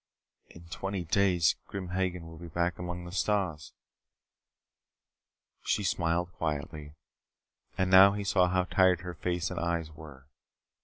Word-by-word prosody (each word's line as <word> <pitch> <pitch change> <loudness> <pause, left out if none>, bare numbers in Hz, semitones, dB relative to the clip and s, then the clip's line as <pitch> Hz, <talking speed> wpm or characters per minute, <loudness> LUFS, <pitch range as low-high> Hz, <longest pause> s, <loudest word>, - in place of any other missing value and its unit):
"In 85 - -14
twenty 95 +1 -4
days 90 -1 +2
Grim 95 -2 -6
Hagen 90 -2 -2
will 80 -1 -11
be 85 - -9
back 85 +1 -1
among 90 0 -5
the 90 - -8
stars 90 -5 -1 1.2
" - - -29
She 105 - +1
smiled 85 -1 0
quietly. 75 -1 -4 0.8
And 95 0 0
now 95 +1 +8
he 100 0 -3
saw 90 -2 +3
how 90 0 +1
tired 90 -1 +3
her 90 -1 -6
face 90 +1 -2
and 90 - -4
eyes 85 -2 -2
were. 75 -4 -13
90 Hz, 145 wpm, -29 LUFS, 85-95 Hz, 1.2 s, now